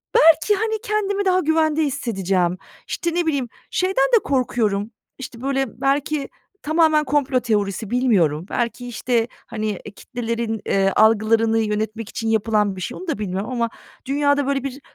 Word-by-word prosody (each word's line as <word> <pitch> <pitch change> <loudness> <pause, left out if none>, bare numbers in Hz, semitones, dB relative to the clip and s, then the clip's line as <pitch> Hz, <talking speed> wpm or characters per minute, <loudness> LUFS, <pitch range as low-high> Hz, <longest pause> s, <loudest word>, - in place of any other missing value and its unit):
belki, 325 +6 +6
hani, 440 +2 -1
kendimi 405 -1 -1
daha 370 -1 +3
güvende 315 -1 +2
hissedeceğim. 195 - 0 0.3
İşte, 340 -2 -2
ne 350 -1 +1
bileyim, 280 -6 -1 0.2
şeyden 370 -7 +2
de 445 - +3
korkuyorum, 230 -6 0 0.3
işte, 245 -3 -8
böyle, 270 -2 -2
belki 280 +1 0 0.3
tamamen 310 0 +3
komplo 280 -2 +1
teorisi, 210 -3 -1
bilmiyorum. 195 - +2
Belki, 240 +1 -2
işte, 235 -1 0 0.2
hani, 215 -1 -3
eee, 205 - -6
kitlelerin, 230 -1 -4
eee, 195 0 +2
algılarını 225 +1 +4
yönetmek 220 +1 -2
için 225 -2 -3
yapılan 215 -2 +1
bir 185 - -8
şey, - - -4
onu 370 - -9
da 320 - -1
bilmiyorum 195 +1 -3
ama 235 -2 0 0.4
dünyada, 285 0 +1
böyle, 275 -1 0
bir 275 0 -5
245 Hz, 155 wpm, -21 LUFS, 215-295 Hz, 0.4 s, belki